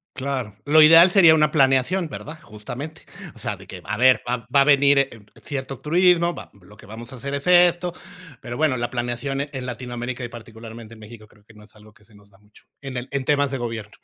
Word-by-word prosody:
Claro. 130 -6 -4
Lo 155 +2 +6
ideal 165 +4 +8
sería 175 -4 +6
una 150 -1 +3
planeación, 140 +5 +1
¿verdad? 155 +1 -9
Justamente, 130 +9 -9 0.3
o - - -16
sea, - - -4
de - - -15
que: - - -10
"A 110 - -4
ver, 130 +1 +4
va 125 -1 -3
a - - +6
venir, 140 0 +4
eh, 140 - +1 0.3
cierto 135 -2 -6
turismo, 175 +1 +2
va - - -11
lo 105 +4 -18
que - - -16
vamos 115 +4 -11
a - - -9
hacer 140 +3 -7
es 140 +3 -5
esto, 175 0 +4 0.5
pero 120 -3 -8
bueno", 150 -2 0
la 120 0 -4
planeación, 125 +3 -3
eh, 145 - -5
en 130 -2 -6
Latinoamérica 125 0 -6
y - - -4
particularmente 115 -1 -12
en 110 - -15
México, 110 0 -13
creo 105 0 -25
que 110 +1 -21
no 105 - -16
es 105 - -21
algo 105 0 -18
que 105 - -25
se 110 - -25
nos 100 0 -21
da 95 - -25
mucho, 105 +1 -24 0.2
en 135 -2 -7
el 125 - -6
en 140 -2 -3
temas 145 -1 +1
de 135 - -4
gobierno. 115 -3 -6
130 Hz, 235 wpm, -22 LUFS, 115-150 Hz, 0.5 s, ideal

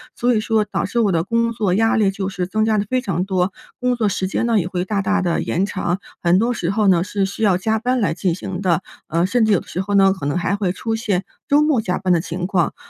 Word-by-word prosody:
所 245 0 +1
以 - - +2
说 220 -1 +1
导 205 - -2
致 235 +5 -1
我 210 -4 +3
的 165 -2 +1
工 230 +3 0
作 205 -5 0
压 225 +4 +2
力 205 -3 +3
就 195 0 -3
是 180 -1 -3
增 215 +4 0
加 220 -1 +2
得 205 - 0
非 255 +1 0
常 185 -6 -2
多， 185 -1 0 0.3
工 250 0 +1
作 220 -3 0
时 190 -1 -1
间 210 - -1
呢， 230 -3 +3
也 175 - -2
会 180 0 -2
大 200 0 -1
大 200 0 +1
地 170 -2 0
延 185 +3 0
长， 185 -2 -2 0.2
很 175 +1 +3
多 235 +4 +1
时 175 -5 -2
候 210 0 +1
呢， 175 -2 +4
是 200 0 -1
需 200 +3 -6
要 195 -4 +3
加 220 +3 0
班 250 +2 0
来 175 -7 +1
进 175 0 -1
行 185 0 -6
的， 175 -4 +1 0.2
呃， 165 +2 +1
甚 235 +4 +2
至 215 - +3
有 180 - +3
的 - - -14
时 185 - -3
候 200 +1 -2
呢， 195 -1 +5
可 165 -7 -5
能 145 - 0
还 180 +3 0
会 195 -3 -1
出 225 +4 -3
现 205 -5 -1 0.3
周 290 +1 +5
末 290 -7 +2
加 180 -3 -1
班 185 -2 +1
的 165 - +2
情 175 +1 -4
况。 185 -4 0
195 Hz, 305 characters per minute, -20 LUFS, 180-220 Hz, 0.3 s, 呢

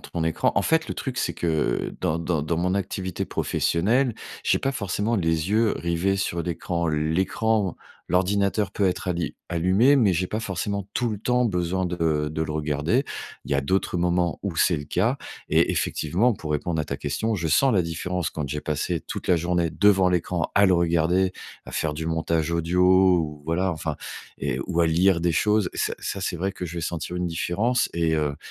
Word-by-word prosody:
ton 85 -2 -4
écran. 80 - +1
En - - +2
fait, 160 0 +1
le - - -3
truc 130 -3 -4
c'est - - -1
que, 85 - -3
heu, 75 -7 0
dans 80 +1 0
dans 85 -2 -1
dans 80 +2 -1
mon 90 +2 0
activité 95 -1 -3
professionnelle, 115 +9 +1 0.3
j'ai - - +2
pas 135 - -1
forcément 105 -1 -1
les 80 -1 0
yeux 110 +1 +3
rivés 85 +3 0
sur 85 -3 -1
l'écran 85 0 -2
l'écran 95 +6 0 0.3
l'ordinateur 100 +2 +1
peut 100 -1 +1
être 90 0 -1
alli 85 -1 -2
allumé. 95 +11 +4
Mais 105 -8 +4
j'ai 90 +2 0
pas 110 - -2
forcément 100 -1 -3
tout 120 -2 +1
le 105 - -4
temps 125 +3 +1
besoin 90 -3 0
de, 90 0 -3
heu, 75 -2 +1
de 80 - -4
le 80 -1 -3
regarder. 75 - 0 0.4
Il - - -10
y - - +2
a 70 - +2
d'autres 90 +5 0
moments 85 0 +1
où 100 -4 -2
c'est 85 - +3
le 75 - -5
cas. 115 - 0 0.3
Et - - +3
effectivement, 95 +11 +1
pour 80 -7 -5
répondre 80 +2 -1
à - - -2
ta 70 -1 -4
question, 110 +10 -1
je 85 -4 -2
sens 130 - +4
la 90 - +4
différence 85 +1 -3
quand 75 -3 -4
j'ai 75 +2 -3
passé 80 +3 -2
toute - - -7
la 90 - +4
journée 85 0 0
devant 95 -1 +4
l'écran 90 -1 -1
à 100 0 +6
le 95 - +4
regarder, 85 +2 +2 0.3
à - - -10
faire 80 -2 -1
du 80 +1 -4
montage 80 0 0
audio 85 +2 0 0.4
ou 75 -2 -4
voilà, 90 +4 0
enfin, 80 -2 -4 0.4
et - - -2
ou, 85 - +1
à 85 - +4
lire 85 +2 +3
des 85 0 +1
choses. 105 +2 +2
Ça - - -1
ça 100 - -4
c'est 90 -1 -2
vrai 95 +3 -2
que - - -6
je 85 0 -6
vais 85 - -2
sentir 85 +1 -4
une 90 0 -1
différence 95 +9 0
et 85 -1 +1
heu, 75 -2 0
90 Hz, 210 wpm, -24 LUFS, 80-100 Hz, 0.4 s, à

